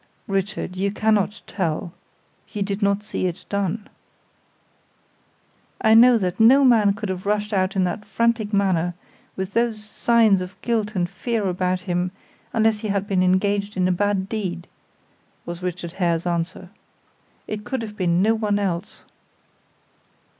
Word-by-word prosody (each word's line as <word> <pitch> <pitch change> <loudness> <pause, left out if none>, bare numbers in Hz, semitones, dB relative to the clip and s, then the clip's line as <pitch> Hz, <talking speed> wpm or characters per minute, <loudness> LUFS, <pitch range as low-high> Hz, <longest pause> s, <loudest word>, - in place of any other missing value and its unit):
"Richard, 195 -1 -2
you 200 +1 0
cannot 210 -1 +1
tell; 170 -3 -3 0.6
you 205 -2 -2
did 200 +1 -3
not 200 0 +1
see 200 -3 -2
it 175 -1 -6
done." 200 +1 -2 1.9
"I 220 -1 +4
know 240 +2 +7
that 185 -2 -2
no 265 +5 +7
man 215 -5 +5
could 210 -1 -5
have 185 +1 -4
rushed 210 +1 0
out 190 0 +1
in 190 - +2
that 180 +4 -2
frantic 230 0 0
manner, 180 -4 +1 0.4
with 190 +1 -4
those 230 -2 0
signs 220 -2 +3
of 185 +1 -8
guilt 220 -3 -1
and 175 -2 +1
fear 225 +3 -2
about 185 0 -1
him, 180 -1 -1 0.4
unless 220 -2 +2
he 215 - -4
had 200 -1 0
been 195 -2 +1
engaged 200 +2 +1
in 185 -1 +2
a - - +2
bad 195 +1 0
deed," 185 -5 -4 0.8
was 175 +1 -6
Richard 180 -1 -4
Hare's 175 -2 0
answer. 175 +1 -3 0.7
"It 210 -1 -5
could 260 0 -3
have 210 -1 -7
been 180 -2 +1
no 220 +2 +4
one 210 -2 0
else." 190 -2 -3
200 Hz, 155 wpm, -23 LUFS, 185-215 Hz, 1.9 s, know